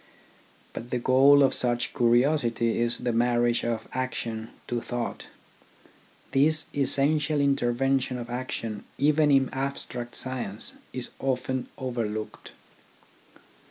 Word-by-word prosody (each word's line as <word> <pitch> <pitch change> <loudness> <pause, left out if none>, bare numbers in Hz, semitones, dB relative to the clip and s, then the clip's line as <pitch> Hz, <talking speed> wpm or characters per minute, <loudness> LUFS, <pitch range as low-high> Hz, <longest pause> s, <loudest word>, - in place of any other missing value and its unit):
But 120 - -7
the 125 - -1
goal 135 +3 +6
of 135 - +3
such 120 -1 +1
curiosity 120 -1 +2
is 120 0 +1
the 120 -1 -2
marriage 120 0 +2
of 115 -2 -2
action 115 -3 -3 0.2
to 120 -1 -2
thought. 120 0 -4 1.0
This 155 +4 +2
essential 145 +2 +2
intervention 135 -1 +1
of 120 -1 -6
action 120 -3 -4
even 150 +2 +3
in 135 -2 +3
abstract 130 -3 -4
science 120 -5 -2 0.2
is 130 -1 -4
often 130 -1 -1
overlooked. 115 -4 -4
125 Hz, 110 wpm, -27 LUFS, 120-135 Hz, 1.0 s, goal